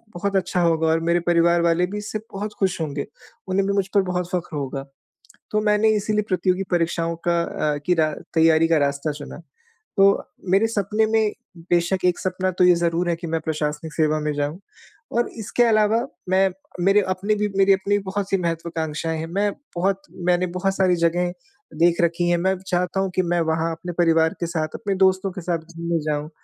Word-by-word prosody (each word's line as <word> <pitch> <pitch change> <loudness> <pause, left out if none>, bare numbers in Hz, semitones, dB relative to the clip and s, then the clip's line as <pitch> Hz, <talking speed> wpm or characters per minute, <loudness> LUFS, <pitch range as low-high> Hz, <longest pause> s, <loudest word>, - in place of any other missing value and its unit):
बहुत 200 +3 -2
अच्छा 180 -1 +1
होगा 165 -1 +2
और 160 +1 +3
मेरे 170 +1 +3
परिवार 170 0 +4
वाले 170 +1 +2
भी 205 - -5
इससे 210 +1 -4
बहुत 205 +2 -4
खुश 190 -3 0
होंगे। 145 -2 -3 0.4
उन्हें 190 +1 +1
भी 200 - +1
मुझ 195 -1 +1
पर 200 - +6
बहुत 180 -1 -1
फ़ख़्र 175 -4 -3
होगा। 135 -1 -4 0.7
तो 215 - +1
मैंने 210 +1 +3
इसीलिए 210 +1 0
प्रतियोगी 185 0 +1
परीक्षाओं 170 -1 0
का 170 0 +3 0.3
अ, - - -3
की 180 - +4
रा 155 -2 +2 0.2
तैयारी 160 0 +4
का 165 - +4
रास्ता 140 +1 0
चुना। 145 0 -9 0.6
तो 195 - +6 0.5
मेरे 195 +4 +4
सपने 215 0 0
में 220 -1 +2 0.4
बेशक 175 +2 +1
एक 180 -1 +2
सपना 185 0 -1
तो 180 - +5
ये 180 -1 +7
ज़रूर 170 +1 0
है - - +2
कि 170 +1 -7
मैं 165 0 -1
प्रशासनिक 155 0 -3
सेवा 155 -1 +2
में 150 0 -1
जाऊँ 145 +3 -2 0.5
और 240 +1 +1
इसके 220 +3 0
अलावा 225 +2 +3 0.2
मैं 190 +1 +4 0.4
मेरे 195 +2 +5
अपने 195 +3 0
भी 210 0 0
मेरी 195 0 +6
अपनी 200 +1 +1
बहुत-सी 195 0 -1
महत्वाकांक्षाएँ 165 -2 -3
हैं। 160 - -4
मैं 200 +5 0 0.3
बहुत 195 +2 0 0.3
मैंने 180 0 +3
बहुत 195 +1 0
सारी 185 -2 +3
जगहें 175 +1 +1 0.5
देख 170 +1 +3
रखी 170 +1 +1
हैं, 175 - +4
मैं 190 +2 +1
चाहता 180 0 -1
हूँ 195 -1 0
कि 185 - +3
मैं 175 -1 0
वहाँ 160 +1 0
अपने 175 +2 -6
परिवार 165 -1 +3
के 170 - 0
साथ, 160 -2 -2
अपने 200 -1 -2
दोस्तों 190 0 +3
के 185 - -6
साथ 170 -1 -1 0.2
घूमने 170 0 -1
जाऊँ। 150 0 -2
175 Hz, 195 wpm, -22 LUFS, 165-195 Hz, 0.7 s, ये